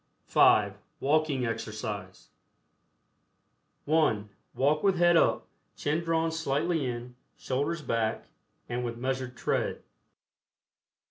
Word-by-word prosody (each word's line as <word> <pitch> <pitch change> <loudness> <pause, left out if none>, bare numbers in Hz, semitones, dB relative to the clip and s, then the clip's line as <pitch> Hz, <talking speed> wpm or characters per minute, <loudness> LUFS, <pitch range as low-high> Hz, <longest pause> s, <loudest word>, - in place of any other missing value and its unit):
(5) - - +4 0.2
WALKING 145 -2 +1
EXERCISE. 105 -4 -5 1.6
(1) 145 -10 +2 0.3
Walk 145 +3 +2
with 195 -2 +3
head 175 0 +5
up, - - +3 0.3
chin 155 +3 -1
drawn 165 0 +1
slightly 160 -1 0
in, 120 0 -5 0.2
shoulders 145 +5 -2
back, 115 -3 -1 0.4
and 120 +1 -3
with 120 -1 -4
measured 130 0 -3
tread. - - -1
135 Hz, 95 wpm, -29 LUFS, 120-160 Hz, 1.6 s, head